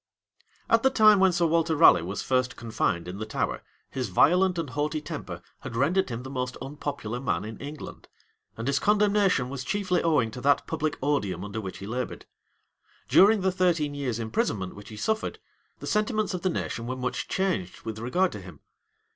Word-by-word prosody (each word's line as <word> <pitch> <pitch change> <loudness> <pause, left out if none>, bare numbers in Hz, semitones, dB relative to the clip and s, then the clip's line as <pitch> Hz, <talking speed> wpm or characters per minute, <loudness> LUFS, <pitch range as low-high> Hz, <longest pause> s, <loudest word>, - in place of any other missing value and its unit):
} 450 -2 -36
At 230 - +5
the 265 - +4
time 215 -5 +6
when 190 -1 +5
Sir 175 -1 +1
Waller 165 0 +2
Raleigh 145 - +7
was 95 +4 -4
first 130 -1 0
confined 110 -7 -1
in 95 +3 -6
the 110 - -3
Tower, - - -2 0.3
his 130 -5 -3
violent 180 - +4
and 160 -6 -3
haughty 150 +2 -1
temper 150 - -7 0.2
had 115 - -7
rendered 165 +10 +2
him 120 0 -5
the 130 - -7
most 125 -1 -3
unpopular 135 -4 -5
man 125 -4 -1
in 110 0 -8
England; 145 +1 -8 0.5
and 115 - -4
his 140 +1 +1
condemnation 205 -9 +3
was 135 0 -5
chiefly 185 +4 0
owing 145 -9 +2
to 125 - -8
that 140 +2 +3
public 155 -2 -2
odium 105 -10 0
under 105 +2 -5
which 95 -3 -6
he 100 - -8
labored. 125 +4 -4 0.8
During 205 +2 +6
the 190 0 +2
thirteen 175 -5 +1
years' 135 -5 -2
imprisonment 110 -4 -2
which 100 0 -12
he 110 - -9
suffered, 220 - -1 0.4
the - - -9
sentiments 215 -1 0
of 180 - -3
the 185 - +1
nation 120 -8 -3
were 130 - -2
much 125 -1 -3
changed 185 - -2
with 110 -1 -5
regard 175 +11 +1
to 105 - -7
him. 90 -6 -12
140 Hz, 195 wpm, -27 LUFS, 115-185 Hz, 0.8 s, Raleigh